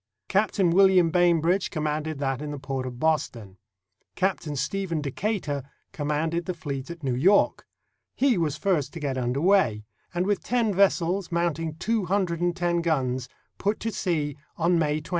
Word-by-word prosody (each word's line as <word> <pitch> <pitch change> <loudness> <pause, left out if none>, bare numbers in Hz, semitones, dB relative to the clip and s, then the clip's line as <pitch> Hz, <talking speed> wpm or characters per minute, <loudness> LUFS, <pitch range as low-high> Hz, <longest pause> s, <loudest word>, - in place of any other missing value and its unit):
Captain 200 -3 +2
William 185 -2 +5
Bainbridge 175 +1 +3
commanded 155 -1 -2
that 135 -1 -2
in 150 - -4
the 145 - -5
port 135 -1 -4
of 125 -1 -8
Boston. 115 -11 -1 0.6
Captain 185 -6 -1
Stephen 170 +4 -2
Decatur 150 - -2 0.3
commanded 160 +3 -1
the 185 - -3
fleet 140 -4 -5
at 170 -2 -8
New 130 -2 0
York. 180 +11 +3 0.5
He 270 -2 +3
was 155 -5 -1
first 150 -6 0
to 170 - -6
get 140 -3 -2
under 125 +2 -1
way, 170 - +3 0.3
and 175 +1 -1
with 205 -1 0
ten 235 -4 +1
ves 195 +1 +5
sels, 180 +2 -2
mounting 165 -2 -1
two 220 +4 -1
hundred 180 -2 0
and 175 -1 +1
ten 175 -1 0
guns, 130 -6 -1 0.3
put 205 +2 0
to 225 - -2
sea 155 -9 -1 0.2
on 170 +1 +2
May 155 -1 0
20. 150 - -13
165 Hz, 170 wpm, -26 LUFS, 145-185 Hz, 0.6 s, William